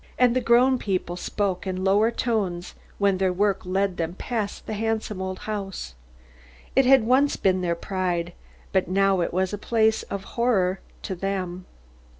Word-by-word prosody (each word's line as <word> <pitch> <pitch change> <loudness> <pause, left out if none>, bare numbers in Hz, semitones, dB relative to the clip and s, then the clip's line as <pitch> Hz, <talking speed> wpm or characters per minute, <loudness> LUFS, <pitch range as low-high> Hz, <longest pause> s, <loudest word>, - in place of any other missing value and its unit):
And 250 -1 +4
the 255 - +2
grown 250 +2 +4
people 185 -3 -2
spoke 190 +1 -2
in 185 0 -2
lower 205 +4 +4
tones 200 -8 -2 0.2
when 200 -2 +2
their 190 -1 +2
work 200 +2 +1
led 190 0 0
them 165 +1 -2
past 215 -1 -4
the - - -4
handsome 220 -2 -2
old 185 0 -3
house. 195 - -4 0.8
It 270 -1 +5
had 265 -2 +6
once 260 +5 +3
been 185 -1 +1
their 170 -1 0
pride, 175 -1 -2 0.4
but 190 -1 +1
now 195 0 +2
it 170 - -1
was 185 +2 0
a 205 - -3
place 220 0 +2
of 200 -1 -4
horror 195 -6 +1 0.2
to - - -3
them. 185 -1 -3
195 Hz, 165 wpm, -25 LUFS, 185-220 Hz, 0.8 s, had